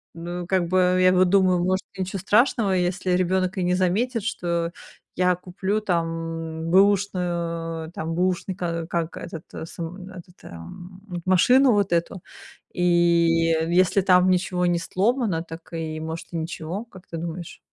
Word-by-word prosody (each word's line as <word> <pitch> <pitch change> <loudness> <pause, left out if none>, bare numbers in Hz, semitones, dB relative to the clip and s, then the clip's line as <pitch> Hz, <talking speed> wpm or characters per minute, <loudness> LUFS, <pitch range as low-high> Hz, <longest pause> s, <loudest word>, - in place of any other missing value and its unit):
ну 175 +1 -6
как 185 -2 +1
бы, 185 0 +3
я 185 0 +5
вот 185 0 +4
думаю, 185 -2 +4
может, 185 +1 0
ничего 190 +1 -3
страшного, 215 +1 +2
если 180 0 0
ребёнок 185 +1 +1
и - - 0
не 180 +1 +2
заметит, 210 +6 0
что 170 -6 -2 0.5
я 180 0 +3
куплю 190 +3 -2
там 165 -3 -3
бэушную, 175 -4 +1
там 165 -1 -4
бэушный, 185 +1 0
ка 170 -3 -3
как 170 -1 -2
этот 165 -1 -8 0.2
сам, 180 +3 -7
этот, 180 -1 -13
эм, 180 - -11
м 175 -1 -5
машину 245 +9 +5
вот 205 -2 +1
эту, 170 +2 -1 0.5
и 180 - -2
если 170 +1 +3
там 185 -1 +4
ничего 180 0 +1
не 175 0 +2
сломано, 195 0 0
так 165 0 -11
и 160 -1 -4
может 160 +1 -6
и 170 - -2
ничего, 165 +4 -4
как 190 -6 -16
ты 170 - -8
думаешь? 170 +1 -6
180 Hz, 150 wpm, -24 LUFS, 170-185 Hz, 0.5 s, я